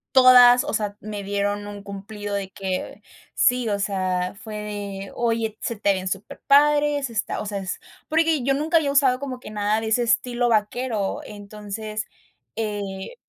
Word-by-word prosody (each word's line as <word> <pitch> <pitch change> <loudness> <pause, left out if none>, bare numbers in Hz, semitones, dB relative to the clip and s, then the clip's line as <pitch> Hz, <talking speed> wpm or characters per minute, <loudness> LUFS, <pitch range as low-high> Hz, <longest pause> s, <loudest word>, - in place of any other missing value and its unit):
todas, 250 -1 +8
o - - -3
sea, 205 -2 -2
me 210 -1 -6
dieron 205 +1 -2
un 205 -1 -8
cumplido 205 +1 -7
de 195 -1 -3
que 190 -1 -4 0.3
sí, 250 -2 +2
o 200 -1 0
sea, 185 -2 -1
fue 215 0 -8
de: 205 -2 -6
"Oye, 225 -2 -1
se 230 - -3
te 200 -1 +2
ven 185 0 -4
superpadres", 290 +7 +2
está 215 -2 -2
o - - -4
sea, 205 -1 -3
es, 185 -1 -4 0.3
porque 320 -3 +2
yo 275 +1 +2
nunca 310 +4 -1
había 290 -3 +1
usado 270 -3 +3
como 260 -3 -5
que 215 - -10
nada 210 +1 0
de 225 - -4
ese 240 +2 +2
estilo 240 +1 +1
vaquero, 215 -1 0
entonces 210 +1 -6 0.5
eh 205 - -4
215 Hz, 165 wpm, -23 LUFS, 200-250 Hz, 0.5 s, todas